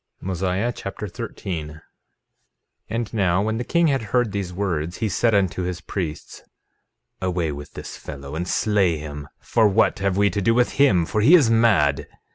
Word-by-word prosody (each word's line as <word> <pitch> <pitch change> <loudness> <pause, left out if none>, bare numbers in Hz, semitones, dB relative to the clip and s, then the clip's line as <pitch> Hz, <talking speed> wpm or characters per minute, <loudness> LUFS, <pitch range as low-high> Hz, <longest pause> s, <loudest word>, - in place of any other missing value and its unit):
Mosiah 95 +5 -1
Chapter 100 +2 -6
13 95 -6 -5
13:1 80 - -14 1.1
And 115 +1 -3
now 95 -3 +2
when 110 +1 -1
the - - -1
king 170 +7 +2
had 140 -5 +2
heard 115 +2 0
these 100 -3 -3
words, 85 -3 -2
he 110 - -1
said 110 +3 +1
unto 95 -2 +1
his 90 -1 -3
priests: 85 -5 -5 0.8
Away 90 -4 -1
with 70 0 -9
this - - -8
fellow, 70 -1 -9
and 85 +3 -3
slay 95 -6 +2
him; 75 -1 -7
for 115 -2 +3
what 95 - +2
have 100 -1 0
we 100 0 +3
to 100 - -2
do 115 +4 +2
with 125 0 +3
him, 95 -12 +4
for 105 - -1
he 150 +11 +7
is 140 -10 +4
mad. 100 -12 +3
95 Hz, 180 wpm, -23 LUFS, 85-110 Hz, 1.1 s, he